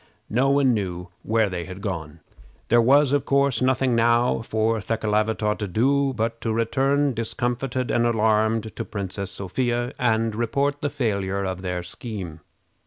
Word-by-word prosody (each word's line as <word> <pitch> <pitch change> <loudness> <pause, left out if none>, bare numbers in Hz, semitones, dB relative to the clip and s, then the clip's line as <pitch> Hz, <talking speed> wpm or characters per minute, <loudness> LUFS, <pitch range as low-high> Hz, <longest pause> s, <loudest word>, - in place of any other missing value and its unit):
No 130 +5 +2
one 140 -2 +4
knew 90 -4 -3
where 110 0 +1
they 90 -3 -4
had 95 0 -8
gone. 85 -5 -5 0.5
There 120 +1 +5
was, 140 +3 +4
of 145 -2 +2
course, 140 -2 +2
nothing 130 0 +2
now 120 +1 +3
for 110 0 0
Thekelavitaw 110 0 0
to 105 - -2
do 135 +8 +2
but 115 +1 -2
to 115 - -1
return, 135 +5 +1
discomfited 120 +2 -2
and 120 0 +2
alarmed, 110 -1 +2
to 110 - -8
the 115 - -3
Princess 100 -1 -5
Sophia, 120 +6 -2
and 115 -2 +1
report 140 +6 -1
the 145 - 0
failure 100 -8 -1
of 95 -1 -4
their 90 -1 -3
scheme. 90 -4 -7
115 Hz, 160 wpm, -24 LUFS, 100-125 Hz, 0.5 s, There